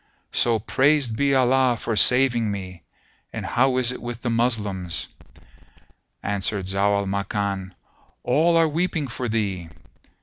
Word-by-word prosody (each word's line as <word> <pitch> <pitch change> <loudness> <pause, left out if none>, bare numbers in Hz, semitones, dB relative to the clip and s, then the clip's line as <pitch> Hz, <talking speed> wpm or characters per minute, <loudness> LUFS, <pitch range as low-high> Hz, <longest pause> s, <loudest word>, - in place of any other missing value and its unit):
So 115 -2 +2
praised 130 +2 +2
be 140 +2 +2
Allah 130 -1 +3
for 115 - -2
saving 120 -1 +3
me! 95 -4 -6 0.5
And - - -5
how 130 +1 +2
is 125 -1 +1
it 125 - -8
with 120 0 -6
the 120 - -1
Moslems?" 105 -7 -1 1.2
Answered 100 -1 -1
Zau 100 +2 +1
al 100 - -1
Makan, 100 -1 -3 0.5
"All 160 +7 +3
are 165 -1 +4
weeping 160 -1 -1
for 125 0 -4
thee." 100 -6 -2
115 Hz, 135 wpm, -23 LUFS, 100-130 Hz, 1.2 s, are